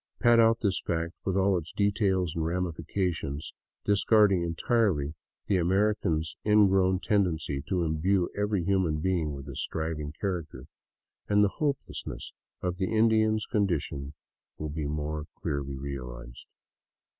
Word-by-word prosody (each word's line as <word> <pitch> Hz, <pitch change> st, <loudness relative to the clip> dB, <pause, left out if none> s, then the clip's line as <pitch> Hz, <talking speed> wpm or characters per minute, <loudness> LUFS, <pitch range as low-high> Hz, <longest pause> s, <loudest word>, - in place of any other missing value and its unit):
Pad 120 Hz, -1 st, +5 dB
out 115 Hz, 0 st, +4 dB
this 100 Hz, -4 st, +1 dB
fact 85 Hz, 0 st, -2 dB
with 95 Hz, 0 st, 0 dB
all 95 Hz, 0 st, +3 dB
its 80 Hz, 0 st, -10 dB
details 100 Hz, -4 st, +1 dB
and 80 Hz, -, -1 dB
ramifications, 85 Hz, -3 st, -2 dB, 0.3 s
discarding 100 Hz, -2 st, +4 dB
en 85 Hz, -1 st, -2 dB
tirely 90 Hz, -11 st, +1 dB, 0.3 s
the 100 Hz, -, +2 dB
American's 90 Hz, -3 st, +1 dB
ingrown 95 Hz, -3 st, +4 dB
tendency 85 Hz, -9 st, 0 dB
to 90 Hz, -2 st, 0 dB
imbue 85 Hz, +4 st, +1 dB
every 105 Hz, -2 st, 0 dB
human 90 Hz, -4 st, +1 dB
being 80 Hz, -3 st, 0 dB
with 70 Hz, 0 st, -9 dB
a 70 Hz, -, -7 dB
striving 80 Hz, -1 st, -3 dB
character, 85 Hz, -9 st, -3 dB, 0.6 s
and 105 Hz, 0 st, +5 dB
the 100 Hz, -, +4 dB
hopelessness 140 Hz, -3 st, -3 dB, 0.3 s
of 90 Hz, -1 st, -1 dB
the 95 Hz, +2 st, -1 dB
Indian's 110 Hz, -1 st, +3 dB
condi 100 Hz, -7 st, +1 dB
tion 70 Hz, +1 st, -7 dB, 0.4 s
will 75 Hz, -, -4 dB
be 75 Hz, 0 st, -3 dB
more 75 Hz, +1 st, -3 dB
clearly 70 Hz, -4 st, -3 dB
realized. 60 Hz, -3 st, -7 dB
90 Hz, 135 wpm, -28 LUFS, 75-100 Hz, 0.6 s, Pad